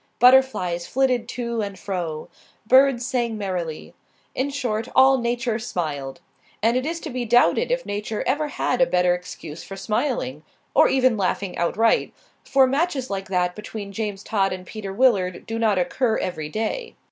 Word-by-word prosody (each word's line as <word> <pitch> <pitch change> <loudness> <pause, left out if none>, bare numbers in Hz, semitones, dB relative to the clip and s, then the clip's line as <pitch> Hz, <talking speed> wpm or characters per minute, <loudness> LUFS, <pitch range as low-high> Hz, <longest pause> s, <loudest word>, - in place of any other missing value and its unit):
Butterflies 245 -10 +4
flitted 255 -3 +1
to 235 -2 -3
and 200 -2 -5
fro; 170 -6 -4 0.4
birds 260 0 +5
sang 235 -2 -1
merrily. 180 -6 -4 0.4
In 265 +2 -1
short, 240 -5 -2
all 265 0 +6
Nature 235 -1 -1
smiled. 155 - -4 0.4
And 230 +2 +3
it 255 +3 0
is 335 +1 -3
to 310 - -6
be 250 0 -2
doubted 245 - +3
if - - -1
Nature 210 +1 -3
ever 295 +4 0
had 260 -3 -1
a 260 - +5
better 180 0 +3
excuse 170 -3 -7
for 195 - -8
smiling 215 - -2 0.3
or - - +6
even 255 -3 +3
laughing 195 -1 -1
outright; 225 +7 +1 0.3
for 270 -1 +4
matches 275 - -1
like 195 -1 -3
that 180 -1 0
between 210 -1 -7
James 205 -1 -4
Todd 195 -3 0
and 185 0 -6
Peter 205 -1 -6
Willard 195 -5 +2
do 225 0 -4
not 215 -4 +2
occur 220 +6 +1
every 155 -5 -3
day. 455 - -3
225 Hz, 165 wpm, -23 LUFS, 185-255 Hz, 0.4 s, all